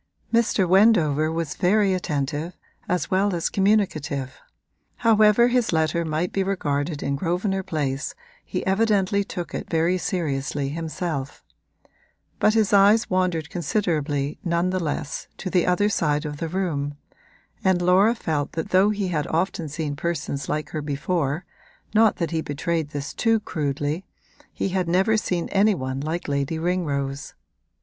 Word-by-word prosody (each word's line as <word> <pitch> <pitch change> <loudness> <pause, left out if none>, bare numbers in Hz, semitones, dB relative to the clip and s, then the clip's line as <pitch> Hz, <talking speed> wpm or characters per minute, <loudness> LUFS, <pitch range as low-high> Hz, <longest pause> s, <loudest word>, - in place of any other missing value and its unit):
Mr. 225 -5 +3
Wendover 170 -6 +4
was 165 -2 -2
very 195 +1 +2
attentive, 155 -1 -2 0.3
as 180 -4 -1
well 195 0 +2
as 170 0 -1
communicative; 170 -10 0 0.6
however 220 0 +5
his 245 -2 +1
letter 160 0 +1
might 160 +2 -1
be 195 - +1
regarded 150 -6 -1
in 140 - 0
Grosvenor 185 +5 -1
Place 145 -5 -3 0.3
he - - -4
evidently 200 0 +2
took 175 -3 -6
it - - -5
very 170 +3 +1
seriously 145 -6 -2
himself; 160 -2 -4 1.0
but 215 +1 +3
his 215 -2 +2
eyes 205 +3 +5
wandered 180 -4 0
considerably, 155 -5 -1
none 170 0 +1
the 185 - 0
less, 145 -2 -3
to 185 - -5
the 180 -2 +2
other 180 +3 +3
side 150 -6 0
of 150 -1 -5
the 165 - -3
room, 150 -6 -2 0.7
and 190 -2 +3
Laura 185 +6 +4
felt 150 -9 -2
that 160 - -3
though 190 +3 +5
he 205 -3 -1
had 150 -4 -1
often 165 -1 -1
seen 150 -1 -3
persons 150 -3 -3
like 155 0 -2
her 155 - -3
before 145 +2 -2 0.5
(not 220 -1 +5
that 170 -1 -2
he 160 -1 0
betrayed 160 +1 -2
this 145 0 -5
too 225 -1 +2
crudely) 145 -2 -2 0.5
he - - -2
had 185 -1 -1
never 190 +6 +3
seen 180 -5 -1
any 205 +1 +3
one 130 -3 -3
like 160 +4 -3
Lady 140 +2 -1
Ringrose. 145 -5 -2
170 Hz, 150 wpm, -24 LUFS, 150-190 Hz, 1.0 s, however